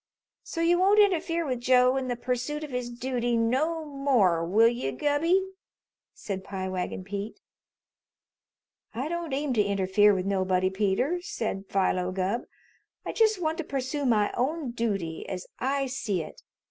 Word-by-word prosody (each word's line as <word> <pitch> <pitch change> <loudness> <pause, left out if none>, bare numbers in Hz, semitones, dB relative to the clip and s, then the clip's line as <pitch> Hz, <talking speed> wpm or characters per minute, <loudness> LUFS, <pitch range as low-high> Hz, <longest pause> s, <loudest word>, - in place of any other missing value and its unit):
"So 330 - -5
you 345 +1 +3
won't 400 +3 +5
interfere 340 -4 +2
with 255 -4 -2
Joe 250 +1 +4
in 265 -1 -1
the 245 - -1
pursoot 255 +5 -3
of 300 - -7
his 250 -1 -3
dooty 240 -1 -1
no 300 +8 0
more, 260 - +2
will 210 +7 +4
you, 235 - -1
Gubby?" 290 - +2 0.7
said 190 -2 -6
Pie 190 -1 -4
Wagon 185 0 -3
Pete. 200 +2 -6 1.6
"I 260 +5 -2
don't 340 -1 -4
aim 275 0 -1
to 215 -3 +3
interfere 200 +1 +3
with 185 -1 -2
nobody, 185 -1 +1
Peter," 210 - 0
said 230 - -4
Philo 185 -2 +1
Gubb. 190 +5 -1 0.6
"I - - -2
just 435 -3 +3
want 320 0 -1
to - - -1
pursoo 275 0 -2
my 210 -4 +2
own 275 +1 -1
dooty, 200 -9 -3
as 180 - -5
I 275 +1 0
see 215 -9 -2
it. 155 - -12
245 Hz, 160 wpm, -27 LUFS, 195-295 Hz, 1.6 s, won't